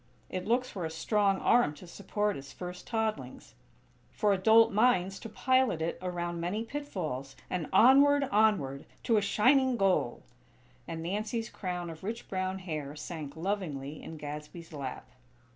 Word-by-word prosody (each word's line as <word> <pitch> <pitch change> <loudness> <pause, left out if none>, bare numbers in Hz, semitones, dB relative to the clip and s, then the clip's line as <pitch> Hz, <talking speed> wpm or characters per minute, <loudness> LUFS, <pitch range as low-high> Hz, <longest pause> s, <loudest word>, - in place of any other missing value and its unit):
It 185 +1 -4
looks 250 +2 +2
for 190 -7 -6
a 160 - -2
strong 195 +4 +1
arm 235 -11 +3
to 150 - -12
support 205 +3 -2
its 135 0 -9
first 180 +5 -8
toddlings; 220 -2 -3 0.6
for 210 -2 +2
adult 220 +4 +5
minds 195 -4 +2
to 225 - -8
pilot 255 -4 +2
it 165 +1 -2
around 175 -1 -3
many 185 +6 -2
pitfalls; 180 - -5 0.2
and 175 -4 -2
onward, 280 +3 +6
onward!! 195 -11 +2 0.2
To 230 - +3
a - - +3
shining 255 +5 +3
goal!!" 190 - +1 0.6
and 165 0 -5
Nancy's 215 +5 -3
crown 180 -3 -4
of 160 +1 -12
rich 225 +4 -5
brown 185 0 -2
hair 155 -6 -5
sank 150 -1 -7
lovingly 160 -6 -3
in 160 - -8
Gadsby's 150 +3 -8
lap. 135 -3 -6
185 Hz, 150 wpm, -30 LUFS, 160-220 Hz, 0.6 s, onward